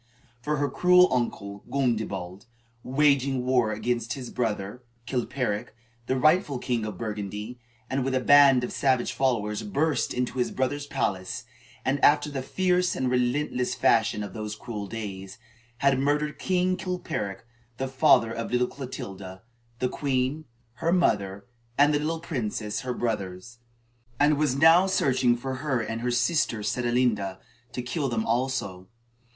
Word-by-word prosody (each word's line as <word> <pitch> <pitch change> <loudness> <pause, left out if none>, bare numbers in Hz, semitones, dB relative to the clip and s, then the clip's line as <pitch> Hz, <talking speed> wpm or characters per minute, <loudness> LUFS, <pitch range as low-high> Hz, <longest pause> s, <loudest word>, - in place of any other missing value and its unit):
For 150 +4 -1
her 145 +1 +1
cruel 180 +2 +5
uncle, 100 -5 -2
Gundebald, 110 -7 -2 0.3
waging 135 -1 +2
war 125 -4 +2
against 115 +2 -2
his 130 -3 -7
brother 110 -1 -3 0.2
Chilperic, 125 -3 -2 0.3
the 130 - +1
rightful 155 0 +3
king 120 -3 -2
of 105 -4 -6
Burgundy, 105 +2 -5 0.3
had 130 +1 -1
with 130 0 -1
a - - +3
band 135 -1 +6
of 125 - -3
savage 130 -3 +1
followers 110 -6 0
burst 160 -6 0
into 125 +1 -2
his 125 - +1
brother's 140 +2 -2
palace 95 -1 -2 0.4
and, 135 +1 0
after 150 0 +4
the 135 -2 -3
fierce 180 +5 +1
and 130 -1 -1
relentless 125 0 0
fashion 110 -2 +2
of 100 - -7
those 105 -1 -5
cruel 105 -2 -6
days, 95 -3 -7 0.4
had 140 0 +2
murdered 150 +2 0
King 185 0 +1
Chilperic, 165 - -4 0.3
the 135 - -2
father 135 -4 +4
of 115 - -4
little 125 0 +2
Clotilda, 95 -8 -8 0.3
the 125 - 0
queen, 135 +3 -1 0.3
her 165 - 0
mother, 100 - +1 0.3
and 145 +1 +5
the 145 - +1
young 160 +2 -2
princes, 110 -7 -3
her 125 -2 -3
brothers; 110 0 -4 0.6
and 145 0 +4
was 150 -4 +1
now 165 +5 +6
searching 130 -9 +2
for 130 +2 -4
her 135 -3 -1
and 115 0 -4
her 125 - -1
sister 125 -3 +1
Sedelenda, 115 -3 0 0.4
to 125 - -4
kill 140 +2 -2
them 115 -2 -1
also. 115 -7 -2
125 Hz, 145 wpm, -26 LUFS, 110-145 Hz, 0.6 s, band